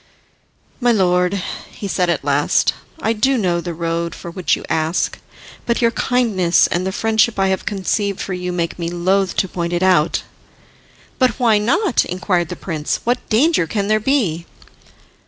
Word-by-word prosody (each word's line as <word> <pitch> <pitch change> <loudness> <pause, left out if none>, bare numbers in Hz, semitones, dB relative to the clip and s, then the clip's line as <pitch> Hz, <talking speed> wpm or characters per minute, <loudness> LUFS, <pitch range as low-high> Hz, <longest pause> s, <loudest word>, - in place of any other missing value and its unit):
"My 245 -2 +3
lord," 180 -2 +2 0.3
he 200 - -7
said 180 -2 0
at 165 -5 0
last, 145 0 +2 0.3
"I 225 - +2
do 260 +5 +2
know 175 -5 0
the 175 - -5
road 170 0 -2
for 170 - -8
which 180 0 0
you - - -9
ask, 160 +2 -1 0.5
but 235 - +1
your 235 -1 +3
kindness 220 -10 +2
and 180 +2 -1
the - - -1
friendship 220 +2 +1
I 195 0 +2
have 190 -1 -2
conceived 200 0 -1
for 190 - -4
you 180 0 -3
make 175 -1 -3
me 170 -1 -2
loth 185 +2 0
to 190 - +1
point 170 -1 -3
it 175 +1 0
out." 180 -5 +3 1.0
"But 255 -4 +2
why 225 -4 +4
not?" 285 - +2
inquired 180 -1 -1
the 180 - -5
prince. 155 -5 -3
"What 245 +1 +1
danger 240 - +3
can 200 +1 -2
there 215 0 +3
be?" 205 - 0
190 Hz, 175 wpm, -19 LUFS, 175-220 Hz, 1.0 s, why